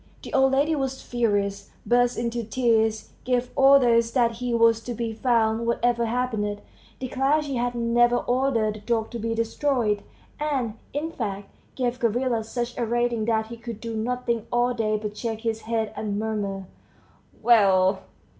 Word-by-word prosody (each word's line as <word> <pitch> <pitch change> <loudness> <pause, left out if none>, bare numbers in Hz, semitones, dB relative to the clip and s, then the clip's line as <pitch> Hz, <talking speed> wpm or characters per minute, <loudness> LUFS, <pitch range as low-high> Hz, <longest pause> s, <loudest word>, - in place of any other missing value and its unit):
The - - -9
old 265 0 +4
lady 290 +4 +2
was 270 -2 -2
furious, 205 -4 -1 0.2
burst 245 0 +2
into 235 0 -2
tears, 225 -1 +1
gave 250 0 0
orders 245 -4 +5
that 235 -3 +2
he 250 0 -3
was 230 -1 +4
to 240 - -4
be 230 0 -3
found 230 -1 +1
whatever 235 0 +1
happened, 220 -4 -1 0.4
declared 270 +4 0
she 275 -3 -3
had 245 0 -1
never 240 +1 +3
ordered 245 -4 +1
the 215 - -9
dog 225 +1 -1
to 235 - -5
be 225 +1 -2
destroyed, 230 -2 0 0.4
and, 275 -7 -1 0.2
in 305 +3 -3
fact, 200 -7 -5 0.3
gave 250 -1 -1
Gavrila 235 0 0
such 240 +2 -4
a 240 - +1
rating 240 -1 0
that 220 -1 +1
he 235 - -7
could 230 -2 -7
do 230 0 -5
nothing 235 0 -2
all 240 +1 +2
day 215 -2 0
but 210 0 -5
shake 225 -1 -4
his 225 -1 -2
head 225 -2 -1
and 205 -2 -3
murmur, 205 -3 -3 0.8
"Well!" 195 -5 +4
235 Hz, 165 wpm, -25 LUFS, 220-245 Hz, 0.8 s, orders